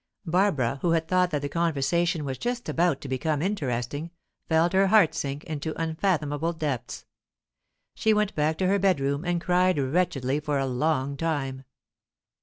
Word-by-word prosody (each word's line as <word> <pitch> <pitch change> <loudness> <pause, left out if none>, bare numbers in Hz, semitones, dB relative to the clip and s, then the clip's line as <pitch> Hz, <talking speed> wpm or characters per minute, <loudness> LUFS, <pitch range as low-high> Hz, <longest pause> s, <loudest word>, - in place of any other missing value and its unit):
Barbara, 160 - +1
who 170 -2 +2
had 165 -1 0
thought 180 +1 +2
that 145 -4 -2
the - - -1
conversation 165 +1 0
was 135 -2 -4
just 240 0 -3
about 170 -4 +1
to - - -7
become 140 +3 -1
interesting, 145 - -2 0.4
felt 165 +2 +3
her 195 +1 +4
heart 205 -5 +5
sink 140 +1 -4
into 155 -1 -5
unfathomable 160 -2 0
depths. 150 -7 -4 0.9
She 220 - +1
went 210 -1 +1
back 155 +1 0
to 185 - +1
her 200 +1 +2
bedroom 145 -6 +1
and 175 -1 0
cried 180 0 +2
wretchedly 140 -2 0
for 150 -1 -1
a 135 - 0
long 135 +1 0
time. 135 -4 -2
160 Hz, 160 wpm, -26 LUFS, 140-180 Hz, 0.9 s, heart